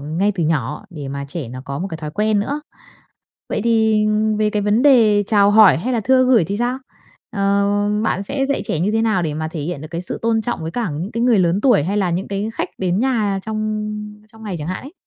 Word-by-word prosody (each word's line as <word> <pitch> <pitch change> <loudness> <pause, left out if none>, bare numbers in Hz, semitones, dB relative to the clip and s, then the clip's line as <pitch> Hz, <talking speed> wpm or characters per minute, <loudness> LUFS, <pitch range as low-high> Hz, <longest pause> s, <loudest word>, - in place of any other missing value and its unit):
ngay 165 +8 0
từ 175 -4 -1
nhỏ 155 - -1
để 150 -6 -7
mà 140 +1 -5
trẻ 150 -5 -6
nó 130 +2 -7
có 140 0 -5
một 190 - -3
cái 160 - -4
thói 155 -2 -6
quen 210 +4 +1
nữa. 285 +8 -3 0.9
Vậy - - -2
thì 220 -2 +2 0.3
về 215 0 +2
cái 210 -1 -1
vấn 210 +4 +2
đề 225 -7 +5
chào 205 -1 +4
hỏi 210 -2 +7
hay 245 +10 -2
là 235 - +1
thưa 255 +3 +3
gửi 250 -8 +4
thì 200 +4 -3
sao? 245 +3 -1 0.6
Ờ, 200 0 +2 0.4
bạn 195 -3 0
sẽ 270 +6 -2
dạy 280 - -1
trẻ 155 - -2
như 190 +5 +1
thế 225 0 +1
nào 215 -5 +1
để 155 -3 -2
mà 155 +1 -3
thể 160 -1 -6
hiện 150 0 -4
được 155 - -8
cái 170 0 -4
sự 180 - -5
tôn 225 -1 +1
trọng 240 -7 -3
với 160 - -4
cả 230 -1 -2
những 165 +8 -5
cái 230 - -2
người 240 -3 +4
lớn 180 +1 +2
tuổi, 240 - +4
hay 195 +5 -1
là 190 -4 +1
những 175 +3 -2
cái 200 +2 -3
khách - - -2
đến 185 0 0
nhà 220 -6 +1
trong 215 0 -3 0.4
trong 225 0 -15
ngày 200 -5 -4
chẳng 150 +1 -5
hạn 185 - -4
ấy? 275 - -11
205 Hz, 255 wpm, -19 LUFS, 170-225 Hz, 0.9 s, hỏi